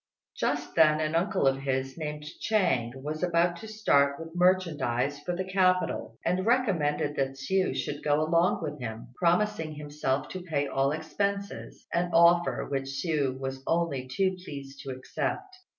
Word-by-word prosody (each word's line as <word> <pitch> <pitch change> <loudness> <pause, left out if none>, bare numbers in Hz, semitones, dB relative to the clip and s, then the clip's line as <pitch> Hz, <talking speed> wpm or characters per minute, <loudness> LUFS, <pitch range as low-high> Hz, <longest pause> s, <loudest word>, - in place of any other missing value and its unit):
Just 145 0 -1
then 155 -2 +5
an 155 0 -1
uncle 180 0 +1
of 135 0 +4
his, 135 -1 -2
named 150 -2 -5
Chang, 155 - +1
was 155 +1 -4
about 175 0 +2
to 220 - -9
start 140 -10 +2
with 165 +1 -9
merchandise 160 -7 +1
for 175 +4 -3
the 185 +1 -2
capital, 185 - +1
and 180 +2 +1
recommended 180 - +1
that 135 0 0
Hsiu 185 +8 0
should 145 0 -3
go 145 0 +3
along 165 +3 +2
with 150 -1 -4
him, 115 -1 -6
promising 170 -2 +1
himself 145 -2 -2
to 185 - -6
pay 155 -5 -1
all 135 0 +1
expenses, 200 +6 -3
an 175 +1 +1
offer 170 +1 +4
which 135 -1 -2
Hsiu 135 -1 -1
was 135 0 -4
only 165 -6 0
too 185 +8 0
pleased 140 -4 -8
to 135 - -8
accept. 375 - -4
155 Hz, 160 wpm, -28 LUFS, 140-180 Hz, -, then